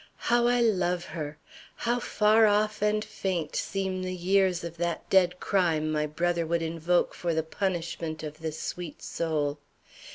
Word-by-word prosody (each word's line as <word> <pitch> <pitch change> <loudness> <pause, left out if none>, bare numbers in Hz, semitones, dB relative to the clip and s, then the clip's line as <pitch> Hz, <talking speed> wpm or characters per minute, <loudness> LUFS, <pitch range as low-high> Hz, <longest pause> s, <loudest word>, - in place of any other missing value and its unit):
How 240 0 +4
I 245 0 +3
love 180 -6 +1
her! 150 -3 -6 0.4
How 240 +1 0
far 215 -1 +4
off 210 0 +1
and 210 0 +1
faint 185 -7 -3
seem 190 -2 -2
the 185 0 -3
years 185 0 +2
of 170 0 -6
that 170 0 -2
dead 180 -1 +4
crime 165 -5 +1
my 150 0 0
brother 170 +3 0
would 170 0 0
invoke 165 +2 +1
for 170 -2 -2
the 160 - +1
punishment 165 -3 -3
of 155 0 -7
this 160 -1 -4
sweet 175 -4 -6
soul! 150 -3 -1
175 Hz, 160 wpm, -28 LUFS, 160-195 Hz, 0.4 s, How